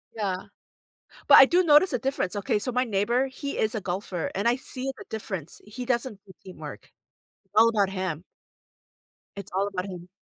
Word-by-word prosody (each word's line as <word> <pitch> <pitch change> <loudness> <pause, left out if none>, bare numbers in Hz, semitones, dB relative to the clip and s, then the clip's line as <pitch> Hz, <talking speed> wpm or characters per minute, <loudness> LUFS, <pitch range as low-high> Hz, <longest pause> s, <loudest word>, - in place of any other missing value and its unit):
Yeah. 195 -4 -3 0.8
But - - +9
I - - +11
do 350 +7 +3
notice 305 +2 +5
a 250 - +1
difference, 225 -6 -2
okay, 205 +1 0
so 250 +4 -3
my 250 +1 +1
neighbor, 235 +4 +1
he 280 +2 -6
is 220 - 0
a 220 - -2
golfer, 180 -2 -3
and 200 +4 -2
I 240 - +3
see 265 0 -5
the - - -11
difference. 190 -7 -6
He 245 +4 -7
doesn't 235 -4 -2
do 190 - -15
teamwork. 185 - -10 0.5
It's - - -42
all 225 +1 +7
about 205 -4 +1
him. 185 -4 -3 1.1
It's 200 - -8
all 195 +1 +1
about 190 -2 -4
him. 180 -1 -9
210 Hz, 190 wpm, -26 LUFS, 190-255 Hz, 1.1 s, I